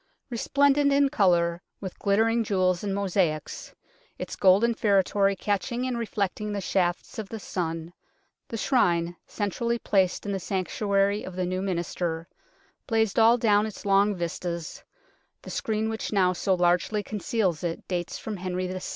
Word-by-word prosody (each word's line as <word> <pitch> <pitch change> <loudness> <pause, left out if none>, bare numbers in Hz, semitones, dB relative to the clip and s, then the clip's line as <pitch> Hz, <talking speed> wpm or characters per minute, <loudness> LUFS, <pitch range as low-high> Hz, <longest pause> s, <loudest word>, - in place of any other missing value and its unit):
Resplendent 280 +4 +3
in 280 0 +4
colour, 175 -9 +2 0.2
with 190 -3 -7
ghttering 225 +3 +2
jewels 185 -3 +1
and 200 -1 -1
mosaics, 185 -6 -1 0.4
its - - -5
golden 200 +5 +4
feretory 200 -1 +2
catching 210 +6 -1
and 255 -1 -1
reflecting 210 -2 -2
the 205 - -2
shafts 180 +1 -1
of 210 -3 -5
the 225 - -5
sun, 165 -3 -4 0.5
the 225 - -5
Shrine, 175 -9 +1
centrally 235 +3 -1
placed 190 -5 +1
in 205 - -2
the 195 - -1
sanctuary 200 +2 0
of 185 - -8
the 185 0 -1
new 185 +1 -2
minster, 170 -3 -2 0.6
blazed 225 -3 +1
all 230 +2 +6
down 215 -2 +3
its 215 - -9
long 200 +1 +3
vistas 170 -1 -4 0.6
(the - - -8
screen 220 0 -1
which 220 0 -3
now 185 -3 +3
so 190 +1 +1
largely 180 +4 +1
conceals 200 -5 -1
it 170 -1 -4
dates 175 -2 -3
from 215 -2 -5
Henry 185 0 -3
VI.). 185 +1 -4
195 Hz, 150 wpm, -26 LUFS, 180-220 Hz, 0.6 s, all